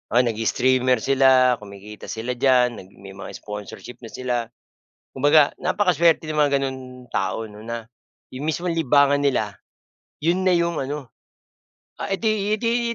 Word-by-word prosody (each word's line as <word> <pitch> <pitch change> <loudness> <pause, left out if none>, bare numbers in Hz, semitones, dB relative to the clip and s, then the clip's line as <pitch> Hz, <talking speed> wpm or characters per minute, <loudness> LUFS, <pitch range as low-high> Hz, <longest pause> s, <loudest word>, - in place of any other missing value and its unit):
Oo, 125 - +7
nag-i-streamer 125 +2 +1
sila, 130 -2 +4
kumikita 105 +1 -11
sila 115 +2 -4
diyan, 125 -3 +3
nag 95 - -12 0.2
may 95 - -9
mga 95 - -9
sponsorship 105 +3 -8
na 115 - -10
sila. 125 -1 -3 0.8
Kumbaga 145 +2 +4
napakasuwerte 170 -5 +2
ng 150 - -1
mga 145 -1 +3
gano'n 130 -1 -3 0.3
tao 105 +4 -1
'no, 105 0 -13
na 115 0 -5 0.5
yung 130 +4 -6
mismong 170 +2 -1
libangan 145 -2 +3
nila, 110 -9 0 0.6
yun 175 +3 +1
na - - +5
yung 170 -1 0
ano 140 0 -5 0.9
ah - - -4
eh 195 - 0
di 215 -2 +1
eh - - -3
di 235 0 0
130 Hz, 155 wpm, -22 LUFS, 115-160 Hz, 0.9 s, Oo